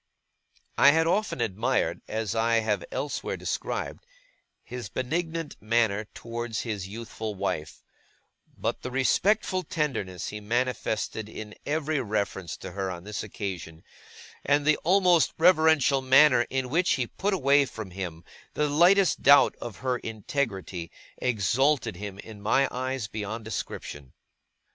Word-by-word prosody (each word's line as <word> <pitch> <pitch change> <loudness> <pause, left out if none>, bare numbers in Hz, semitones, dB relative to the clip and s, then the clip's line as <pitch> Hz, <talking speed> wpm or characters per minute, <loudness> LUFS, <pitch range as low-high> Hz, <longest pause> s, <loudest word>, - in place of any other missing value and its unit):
I 140 - +8
had 160 +1 +3
often 190 -1 0
admired, 110 -3 0
as 110 -3 -2
I 115 +1 +2
have 110 -2 -1
elsewhere 145 - -3
described, - - -3 0.6
his 125 -1 -7
benignant 165 +4 -3
manner 110 -1 +1
towards 115 -1 -4
his 105 -5 -4
youthful 110 0 -6
wife; 95 -6 -3 0.7
but - - -2
the 125 - -4
respectful 185 - +2
tenderness 130 - -3
he 105 - -6
manifested 110 -1 -2
in 110 -1 -8
every 155 0 0
reference 100 -6 -2
to 95 - -8
her 95 0 -3
on 85 -1 -6
this 105 +1 -4
occasion, 90 -6 -6 0.6
and 145 0 +2
the 155 0 +4
almost 180 -2 +3
reverential 160 -5 +4
manner 130 -1 +6
in 130 -1 -2
which 175 +4 +3
he 130 - 0
put 195 - -1
away 140 -3 +4
from 110 -5 -8
him 90 -3 -6 0.3
the 150 - +1
lightest 175 +5 +4
doubt 145 0 +6
of 120 -3 -6
her 125 -1 +1
integrity, 105 - -3 0.3
exalted 125 +1 +1
him, 100 +1 -7
in 105 0 -10
my 135 +6 +3
eyes, 130 -1 -2
beyond 110 +2 -5
description. 75 - -6
120 Hz, 135 wpm, -27 LUFS, 105-145 Hz, 0.7 s, I